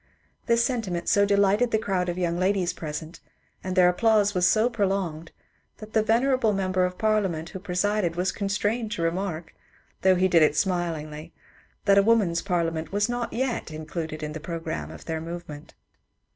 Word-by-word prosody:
This 235 Hz, 0 st, +3 dB
sentiment 215 Hz, -10 st, -2 dB
so 200 Hz, 0 st, +4 dB
delighted 200 Hz, +4 st, +3 dB
the 220 Hz, -, +2 dB
crowd 190 Hz, -4 st, -1 dB
of 175 Hz, -, -3 dB
young 175 Hz, -1 st, -1 dB
ladies 185 Hz, -1 st, +1 dB
present, 160 Hz, 0 st, -6 dB, 0.4 s
and 185 Hz, 0 st, -3 dB
their 180 Hz, -2 st, +6 dB
applause 205 Hz, +2 st, +3 dB
was 180 Hz, -1 st, +3 dB
so 220 Hz, +3 st, +3 dB
prolonged, 190 Hz, -8 st, -2 dB, 0.5 s
that 215 Hz, 0 st, -11 dB
the 220 Hz, -, +4 dB
venerable 230 Hz, +1 st, +2 dB
member 185 Hz, -1 st, +1 dB
of 180 Hz, 0 st, -4 dB
Parliament 195 Hz, -7 st, 0 dB
who 190 Hz, -, -7 dB
presided 185 Hz, -1 st, 0 dB
was 180 Hz, +2 st, 0 dB
constrained 210 Hz, +2 st, -1 dB
to 170 Hz, -, -3 dB
remark, 165 Hz, -1 st, -3 dB, 0.5 s
though 190 Hz, 0 st, +5 dB
he 185 Hz, +1 st, +3 dB
did 170 Hz, -3 st, +4 dB
it 150 Hz, -1 st, +4 dB
smilingly, 160 Hz, -4 st, -2 dB, 0.5 s
that 200 Hz, -1 st, +6 dB
a -, -, +6 dB
woman's 200 Hz, -6 st, +2 dB
parliament 165 Hz, -4 st, -2 dB
was 205 Hz, +3 st, +1 dB
not 240 Hz, 0 st, -2 dB
yet 250 Hz, -4 st, -2 dB
included 155 Hz, 0 st, -6 dB
in 150 Hz, -, -4 dB
the 155 Hz, -, -5 dB
programme 155 Hz, -, -5 dB
of 80 Hz, -, -11 dB
their 160 Hz, -1 st, -3 dB
movement. 165 Hz, -3 st, -8 dB
185 Hz, 170 wpm, -25 LUFS, 165-210 Hz, 0.5 s, their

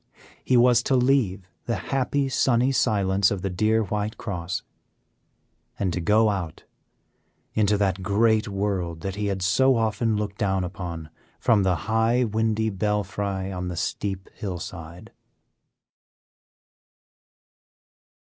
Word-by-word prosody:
He 130 Hz, -, +3 dB
was 120 Hz, 0 st, +5 dB
to 135 Hz, -, +1 dB
leave 120 Hz, -8 st, +2 dB, 0.2 s
the 115 Hz, -, -1 dB
happy, 135 Hz, +6 st, -1 dB
sunny 130 Hz, -1 st, +2 dB
silence 100 Hz, -6 st, +2 dB
of 100 Hz, -3 st, -3 dB
the 95 Hz, -, -1 dB
dear 110 Hz, +4 st, +2 dB
White 105 Hz, +1 st, -3 dB
Cross, 95 Hz, -2 st, -4 dB, 1.1 s
and 95 Hz, -4 st, -1 dB
to 90 Hz, -, -2 dB
go 105 Hz, +5 st, +3 dB
out 90 Hz, -5 st, -5 dB, 0.9 s
into 105 Hz, -1 st, +2 dB
that 95 Hz, -2 st, 0 dB
great 110 Hz, +3 st, +2 dB
world 95 Hz, -5 st, -2 dB
that 95 Hz, +2 st, -3 dB
he 105 Hz, +1 st, -2 dB
had 95 Hz, -2 st, -2 dB
so 130 Hz, +8 st, +4 dB
often 110 Hz, -1 st, 0 dB
looked 105 Hz, -1 st, -4 dB
down 95 Hz, -3 st, +1 dB
upon 85 Hz, -4 st, -6 dB, 0.3 s
from 110 Hz, -3 st, +3 dB
the 95 Hz, -2 st, +2 dB
high 110 Hz, +3 st, +2 dB
windy 110 Hz, 0 st, 0 dB
belfry 100 Hz, -1 st, -2 dB
on 90 Hz, -1 st, -4 dB
the 90 Hz, -1 st, -5 dB
steep 95 Hz, +1 st, -3 dB
hillside. 90 Hz, 0 st, -7 dB
100 Hz, 125 wpm, -25 LUFS, 95-110 Hz, 1.1 s, was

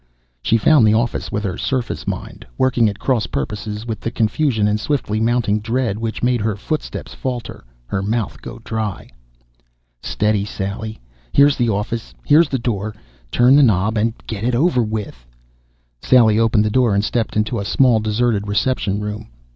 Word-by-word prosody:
She 115 Hz, -, +2 dB
found 120 Hz, 0 st, +5 dB
the 105 Hz, -, +4 dB
office 120 Hz, +1 st, -1 dB
with 105 Hz, -, -2 dB
her 95 Hz, -4 st, -3 dB
surface 130 Hz, -4 st, -2 dB
mind, -, -, -5 dB
working 125 Hz, -4 st, +3 dB
at 100 Hz, -, -6 dB
cross 120 Hz, -4 st, 0 dB
purposes 105 Hz, -, -4 dB
with 110 Hz, -3 st, -4 dB
the -, -, -3 dB
confusion 115 Hz, -1 st, +1 dB
and 105 Hz, 0 st, +1 dB
swiftly 110 Hz, -4 st, -1 dB
mounting 115 Hz, -2 st, +1 dB
dread 115 Hz, -1 st, -1 dB
which 115 Hz, 0 st, -4 dB
made 125 Hz, -2 st, +2 dB
her 110 Hz, -1 st, 0 dB
footsteps 150 Hz, +9 st, -4 dB
falter, 125 Hz, -, -5 dB, 0.2 s
her 95 Hz, +10 st, -2 dB
mouth 110 Hz, +1 st, -2 dB
go -, -, -8 dB
dry. 110 Hz, -4 st, -4 dB, 0.9 s
Steady, 105 Hz, -1 st, 0 dB
Sally! 105 Hz, +2 st, -5 dB, 0.3 s
Here's 140 Hz, 0 st, +5 dB
the 120 Hz, -2 st, +1 dB
office, 110 Hz, +2 st, -3 dB
here's 150 Hz, +1 st, +5 dB
the 135 Hz, -, 0 dB
door. 110 Hz, -3 st, -3 dB, 0.3 s
Turn 125 Hz, +3 st, +5 dB
the 145 Hz, -, +7 dB
knob 110 Hz, -3 st, +3 dB
and 110 Hz, +1 st, 0 dB
get 110 Hz, -2 st, -5 dB
it 120 Hz, +1 st, +1 dB
over 135 Hz, -1 st, +3 dB
with... 105 Hz, -, -4 dB, 0.8 s
Sally 115 Hz, -4 st, +4 dB
opened 115 Hz, -2 st, +3 dB
the 105 Hz, -, 0 dB
door 120 Hz, -3 st, +3 dB
and 100 Hz, +1 st, +1 dB
stepped 115 Hz, -2 st, -1 dB
into 105 Hz, -1 st, 0 dB
a -, -, -3 dB
small, 120 Hz, +3 st, +3 dB
deserted 110 Hz, -1 st, 0 dB
reception 105 Hz, -1 st, 0 dB
room. 105 Hz, +1 st, -5 dB
110 Hz, 170 wpm, -19 LUFS, 105-120 Hz, 0.9 s, the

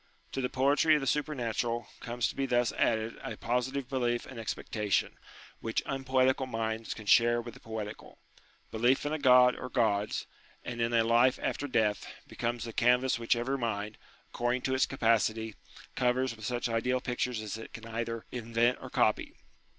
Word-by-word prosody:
To 135 Hz, -, -2 dB
the 125 Hz, -, -1 dB
poetry 140 Hz, +4 st, +4 dB
of 150 Hz, -, +1 dB
the -, -, -3 dB
supernatural, 120 Hz, -5 st, -1 dB
comes 120 Hz, -2 st, -1 dB
to -, -, -6 dB
be 135 Hz, 0 st, -1 dB
thus 120 Hz, -1 st, +2 dB
added 110 Hz, +1 st, 0 dB
a -, -, -6 dB
positive 125 Hz, +2 st, -1 dB
belief 120 Hz, -3 st, -1 dB
and 125 Hz, -, -9 dB
expecta 105 Hz, -1 st, -4 dB
tion, -, -, +2 dB, 0.4 s
which 115 Hz, -, -2 dB
unpoetical 130 Hz, 0 st, +1 dB
minds 115 Hz, -1 st, -3 dB
can 110 Hz, -, -10 dB
share 120 Hz, +3 st, +5 dB
with 120 Hz, -1 st, -7 dB
the 125 Hz, -, -14 dB
poetical. 110 Hz, -2 st, -7 dB, 0.5 s
Belief 120 Hz, +5 st, +2 dB
in 145 Hz, -, -1 dB
a 155 Hz, -, -1 dB
God 125 Hz, -2 st, +6 dB
or 125 Hz, -, -6 dB
Gods, 105 Hz, -4 st, 0 dB, 0.4 s
and 120 Hz, -1 st, -4 dB
in 115 Hz, 0 st, +1 dB
a 115 Hz, -1 st, +4 dB
life 120 Hz, +3 st, +4 dB
after 145 Hz, -, -2 dB
death, 110 Hz, -6 st, +1 dB, 0.2 s
becomes 120 Hz, -1 st, -3 dB
the 115 Hz, -1 st, -6 dB
canvas 125 Hz, +1 st, +3 dB
which 115 Hz, +1 st, +2 dB
every 130 Hz, +3 st, -1 dB
mind, 105 Hz, -2 st, -3 dB, 0.3 s
accord 120 Hz, +1 st, 0 dB
ing 130 Hz, -, -4 dB
to 130 Hz, -, 0 dB
its 130 Hz, -, +3 dB
capacity, 110 Hz, -3 st, +1 dB, 0.4 s
covers 125 Hz, 0 st, +1 dB
with 110 Hz, -1 st, -9 dB
such 120 Hz, +1 st, -1 dB
ideal 120 Hz, +2 st, 0 dB
pictures 125 Hz, -1 st, -2 dB
as 110 Hz, 0 st, -5 dB
it 110 Hz, -, -9 dB
can 115 Hz, -, -9 dB
either 115 Hz, 0 st, -4 dB
invent 120 Hz, 0 st, +1 dB
or -, -, -8 dB
copy. -, -, +1 dB
120 Hz, 180 wpm, -30 LUFS, 115-130 Hz, 0.5 s, God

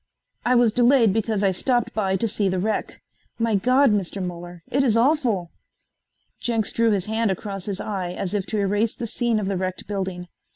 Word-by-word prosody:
"I 250 Hz, +1 st, +3 dB
was 240 Hz, -2 st, +4 dB
delayed 240 Hz, -2 st, +4 dB
because 220 Hz, -1 st, 0 dB
I 195 Hz, -, +4 dB
stopped 240 Hz, +5 st, 0 dB
by 195 Hz, -3 st, 0 dB
to 210 Hz, +4 st, 0 dB
see 205 Hz, -2 st, 0 dB
the 185 Hz, -, -1 dB
wreck. 215 Hz, +4 st, -2 dB, 0.3 s
My 230 Hz, -1 st, 0 dB
God, 255 Hz, +6 st, +4 dB
Mr. 200 Hz, -1 st, -1 dB
Muller, 175 Hz, -1 st, -6 dB
it 275 Hz, -, +2 dB
is 235 Hz, -5 st, +3 dB
awful." 235 Hz, -, +1 dB, 0.9 s
Jenks 225 Hz, -3 st, -1 dB
drew 230 Hz, 0 st, +2 dB
his 200 Hz, -4 st, +1 dB
hand 220 Hz, 0 st, 0 dB
across 195 Hz, 0 st, -4 dB
his 200 Hz, -2 st, -3 dB
eye 190 Hz, -4 st, -3 dB
as 180 Hz, +1 st, -4 dB
if 200 Hz, -3 st, -1 dB
to 215 Hz, -, -2 dB
erase 205 Hz, +2 st, +1 dB
the 235 Hz, -, -4 dB
scene 235 Hz, 0 st, 0 dB
of 210 Hz, -, -2 dB
the 195 Hz, -1 st, -1 dB
wrecked 185 Hz, 0 st, -3 dB
building. 190 Hz, -3 st, -4 dB
210 Hz, 200 wpm, -23 LUFS, 190-230 Hz, 0.9 s, was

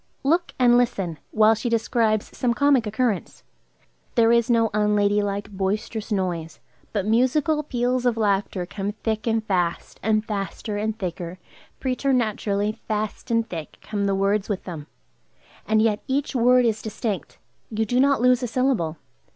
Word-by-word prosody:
Look 335 Hz, +5 st, +1 dB
and 245 Hz, -1 st, +5 dB
listen, 195 Hz, -10 st, -1 dB
while 220 Hz, 0 st, +5 dB
she 225 Hz, +2 st, -2 dB
describes 225 Hz, -2 st, 0 dB
some 240 Hz, -2 st, 0 dB
comic 275 Hz, -4 st, +3 dB
occurrence. 220 Hz, -2 st, -2 dB, 0.7 s
There 230 Hz, -1 st, +5 dB
is 235 Hz, 0 st, +3 dB
no 230 Hz, -2 st, +3 dB
unladylike, 205 Hz, -1 st, +1 dB
boisterous 205 Hz, +3 st, -3 dB
noise, 175 Hz, -5 st, -2 dB, 0.3 s
but 200 Hz, -3 st, -1 dB
musical 260 Hz, +7 st, +2 dB
peals 250 Hz, -2 st, 0 dB
of 235 Hz, -2 st, +1 dB
laughter 200 Hz, -3 st, 0 dB
come 200 Hz, +3 st, -4 dB
thick 215 Hz, +1 st, -3 dB
and 225 Hz, -1 st, +1 dB
fast; 180 Hz, -4 st, -1 dB
and 215 Hz, +1 st, +1 dB
faster 205 Hz, +1 st, -4 dB
and 215 Hz, +1 st, -2 dB
thicker, 180 Hz, -2 st, -5 dB, 0.4 s
preternaturally 225 Hz, -5 st, 0 dB
fast 215 Hz, -1 st, -3 dB
and 230 Hz, -1 st, +1 dB
thick, 165 Hz, -6 st, -7 dB
come 205 Hz, -2 st, -2 dB
the 195 Hz, -, +1 dB
words 195 Hz, +2 st, +1 dB
with 200 Hz, -3 st, -2 dB
them. 160 Hz, -5 st, -7 dB, 0.8 s
And 215 Hz, 0 st, +3 dB
yet 215 Hz, -2 st, +2 dB
each 275 Hz, +3 st, -1 dB
word 250 Hz, 0 st, +4 dB
is 220 Hz, -2 st, 0 dB
distinct; 215 Hz, -, -4 dB, 0.3 s
you 220 Hz, 0 st, -1 dB
do 245 Hz, +4 st, +1 dB
not 275 Hz, -1 st, +3 dB
lose 250 Hz, 0 st, +4 dB
a 245 Hz, -, -1 dB
syllable. 235 Hz, -10 st, 0 dB
220 Hz, 150 wpm, -24 LUFS, 200-240 Hz, 0.8 s, and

